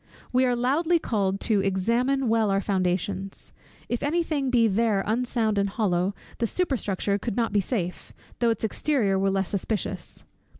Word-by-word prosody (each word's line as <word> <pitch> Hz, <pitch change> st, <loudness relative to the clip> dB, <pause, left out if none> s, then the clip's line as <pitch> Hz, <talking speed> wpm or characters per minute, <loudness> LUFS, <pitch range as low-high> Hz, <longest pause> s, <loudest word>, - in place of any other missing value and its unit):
We 255 Hz, +1 st, +4 dB
are 245 Hz, -, +2 dB
loudly 300 Hz, +8 st, +2 dB
called 200 Hz, -10 st, 0 dB
on -, -, -7 dB
to 215 Hz, -3 st, +2 dB
examine 235 Hz, +8 st, +1 dB
well 225 Hz, -2 st, +2 dB
our 195 Hz, 0 st, +2 dB
foundations. 190 Hz, 0 st, -2 dB, 0.3 s
If 240 Hz, -, -2 dB
any 330 Hz, +4 st, +1 dB
thing 285 Hz, -5 st, -1 dB
be 235 Hz, -3 st, +4 dB
there 210 Hz, -1 st, +1 dB
unsound 225 Hz, -2 st, 0 dB
and 200 Hz, 0 st, +1 dB
hollow, 195 Hz, -2 st, 0 dB, 0.2 s
the 230 Hz, -, +1 dB
superstructure 205 Hz, -, -1 dB
could 215 Hz, +1 st, -3 dB
not 230 Hz, -2 st, 0 dB
be 205 Hz, -, +3 dB
safe, 180 Hz, -4 st, -3 dB, 0.3 s
though 235 Hz, -, +3 dB
its 225 Hz, -1 st, -1 dB
exterior 220 Hz, -4 st, +1 dB
were 195 Hz, 0 st, +2 dB
less 195 Hz, -1 st, 0 dB
suspicious. 205 Hz, +2 st, -3 dB
220 Hz, 170 wpm, -26 LUFS, 195-250 Hz, 0.3 s, We